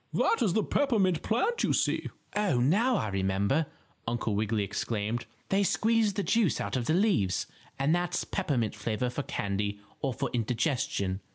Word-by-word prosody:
"That 460 - +3
is 190 - +2
the 220 - +2
peppermint 200 - +2
plant 415 - 0
you - - +2
see." - - 0 0.3
"Oh, 205 -12 +2
now 205 - +3
I 110 - -1
remember," 100 +9 +1 0.4
Uncle 115 -2 -1
Wiggily 105 +1 0
exclaimed. 110 +3 -2 0.2
"They 195 +1 +3
squeeze 220 +1 +2
the 200 - -1
juice 225 -6 +2
out - - -2
of 125 -2 -1
the 160 - +3
leaves, 180 - +2 0.3
and 140 +4 +2
that's 175 0 0
peppermint 135 - -1
flavor 110 +3 -2
for 145 - -2
candy 100 -4 -2 0.2
or 135 - 0
for 135 -2 -2
indigestion." 115 - 0
135 Hz, 165 wpm, -29 LUFS, -, 0.4 s, That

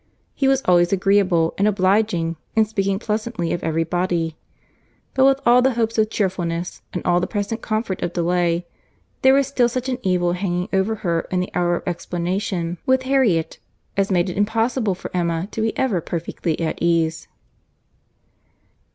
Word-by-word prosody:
He 270 - 0
was 270 0 +2
always 175 -1 +4
agreeable 195 -4 +2
and 200 - +3
obliging, 190 -4 +1 0.2
and 220 -1 +4
speaking 195 -2 0
pleasantly 215 -4 -2
of 175 - -4
every 165 0 0
body. 170 -1 -1 0.8
But 265 0 +4
with 270 0 +4
all 245 +1 +6
the 260 -1 +2
hopes 225 -1 0
of 215 0 +3
cheerfulness, 180 -4 -2
and 180 - -5
all 175 0 +3
the 180 - -1
present 210 +2 -3
comfort 215 -3 -2
of 175 - -1
delay, 175 0 +1 0.6
there 265 +1 +6
was 275 0 +3
still 255 -3 +2
such 255 +2 -3
an 255 -1 -2
evil 180 -3 +1
hanging 180 0 -2
over 195 +3 +1
her 170 -1 0
in 185 - 0
the 180 - -3
hour 175 0 +1
of - - -5
explanation 175 0 -2
with 260 0 +2
Harriet, 255 -12 +1 0.4
as 195 0 +1
made 180 -2 +2
it 180 - -5
impossible 220 0 +1
for 185 - -8
Emma 170 0 0
to 225 - -3
be 220 0 -1
ever 225 -10 +1
perfectly 170 0 -3
at 165 -2 -2
ease. 165 -2 +1
190 Hz, 170 wpm, -21 LUFS, 175-220 Hz, 0.8 s, all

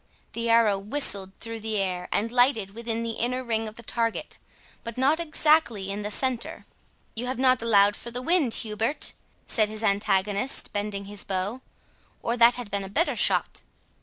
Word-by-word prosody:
The 230 0 -2
arrow 225 -4 +4
whistled 200 -3 +1
through 230 0 -6
the 220 0 -2
air, 180 -2 -2
and 225 +3 0
lighted 245 -5 +3
within 230 0 -3
the 230 -1 -4
inner 250 +2 0
ring 225 -2 -1
of 215 - -9
the 235 - -11
target, 230 0 -2 0.4
but 230 0 -7
not 280 +5 +3
exactly 305 - +2
in 205 +1 -4
the 210 - -3
centre. 250 +2 -2 0.5
"You 240 +3 -3
have 255 - -2
not 255 -1 +3
allowed 205 -3 +4
for 235 - -8
the 245 +1 -5
wind, 310 -7 +2
Hubert," 225 +6 -1 0.3
said 215 -2 +3
his 215 +1 -5
antagonist, 200 +3 +1
bending 205 -1 -3
his 205 0 -4
bow, 200 +6 -3 0.6
"or 235 - 0
that 235 0 +6
had 245 -4 -6
been 200 0 -1
a 190 - -8
better 325 - 0
shot." - - +1
225 Hz, 180 wpm, -26 LUFS, 205-245 Hz, 0.6 s, that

